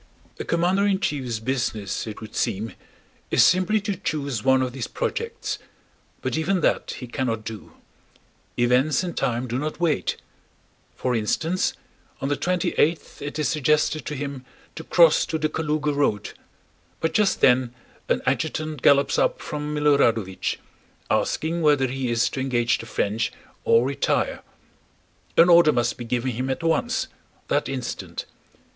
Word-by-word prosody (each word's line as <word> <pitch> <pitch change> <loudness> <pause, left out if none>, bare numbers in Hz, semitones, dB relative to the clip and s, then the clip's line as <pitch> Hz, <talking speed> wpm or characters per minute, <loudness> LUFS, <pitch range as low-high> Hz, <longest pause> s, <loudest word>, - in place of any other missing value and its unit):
A - - -2
commander 180 +4 +2
in 195 -2 +2
chief's 130 - -2
business, 110 -4 -2
it 110 - -7
would 110 - -10
seem, 110 +4 -1 0.6
is - - +5
simply 185 +4 +4
to 200 -1 -2
choose 140 - -3
one 130 0 +4
of 125 -1 -3
these 135 - -4
projects. 465 -1 -3 0.6
But - - -1
even 170 +4 +1
that - - 0
he 125 - -6
cannot 120 -3 -2
do. 110 -1 -8 0.8
Events 125 +6 +3
and 175 -3 -4
time 120 +1 -1
do 120 +2 -2
not 155 +3 -4
wait. 160 - 0 0.8
For 125 -1 -1
instance, 160 +11 0 0.5
on 135 - -2
the 145 - +2
twenty 180 +3 0
eighth 160 +2 +1
it 145 +1 -5
is 150 - +1
suggested 150 +1 +1
to 150 - -3
him 140 -2 -5 0.3
to 160 - -7
cross 165 -1 +5
to 160 - -1
the 155 0 0
Kalúga 150 -2 -1
road, 125 -8 0 0.7
but 160 0 -1
just 205 -3 +2
then 125 -1 +4 0.4
an - - +1
adjutant 155 +1 -1
gallops 140 +2 +4
up - - +1
from 150 -1 -4
Milorádovich 120 -10 +2 0.5
asking 165 +2 0
whether 145 -4 +4
he 130 0 -2
is 120 +1 +2
to - - -4
engage 120 -3 +1
the 115 - -8
French 110 0 -1 0.3
or 115 +2 +5
retire. 140 +1 0 1.0
An 165 - +8
order 170 -3 +7
must 120 -3 0
be 120 - -5
given 125 +2 -1
him 125 +3 -3
at 130 +5 -2
once, 165 +9 +1 0.4
that - - +1
instant. - - -5
140 Hz, 155 wpm, -24 LUFS, 125-160 Hz, 1.0 s, An